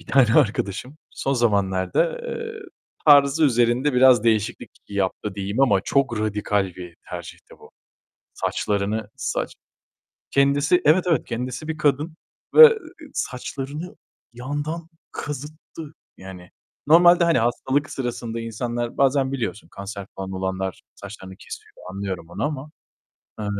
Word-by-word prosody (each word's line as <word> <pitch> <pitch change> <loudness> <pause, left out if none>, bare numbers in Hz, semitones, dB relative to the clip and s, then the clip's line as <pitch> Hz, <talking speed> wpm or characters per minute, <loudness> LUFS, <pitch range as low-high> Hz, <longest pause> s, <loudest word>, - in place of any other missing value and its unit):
bir - - -18
tane 125 -4 +4
arkadaşım 125 0 +1
son 135 - -2
zamanlarda, 105 - +1
eee, 460 -2 -6 0.5
tarzı 145 +1 +6
üzerinde 120 +2 +2
biraz 125 -2 +5
değişiklik 110 -3 0 0.2
yaptı 100 0 -2
diyeyim 100 +4 -3
ama 105 -8 +4
çok 130 -5 +1
radikal 105 -2 0
bir 90 -2 -10
tercihti 85 -2 -9
bu. - - -16 0.6
Saçlarını 105 +1 -2
saç - - -3 0.8
kendisi, 140 +5 +3
evet 160 +5 +5
evet 160 -7 +2
kendisi 125 +5 -5
bir 155 -1 -3
kadın 150 +2 0 0.4
ve 460 -1 +10 0.4
saçlarını 140 +6 -5 0.4
yandan 145 +7 -5 0.2
kazıttı 150 +2 -8 0.2
yani. 95 -2 -11 0.4
Normalde, 175 +3 +6
hani, 170 -3 +3
hastalık 130 +4 0
sırasında 120 -3 -4
insanlar 120 +1 -4
bazen 135 0 +2
biliyorsun, 115 -7 -4
kanser 100 0 -8
falan 95 0 -5
olanlar 95 0 -3
saçlarını 95 -2 -10
kesiyor, - - -11 0.2
anlıyorum 95 -3 -5
onu 95 +5 -3
ama, 145 0 -4 0.7
eee 105 - -3
125 Hz, 120 wpm, -23 LUFS, 100-145 Hz, 0.8 s, ve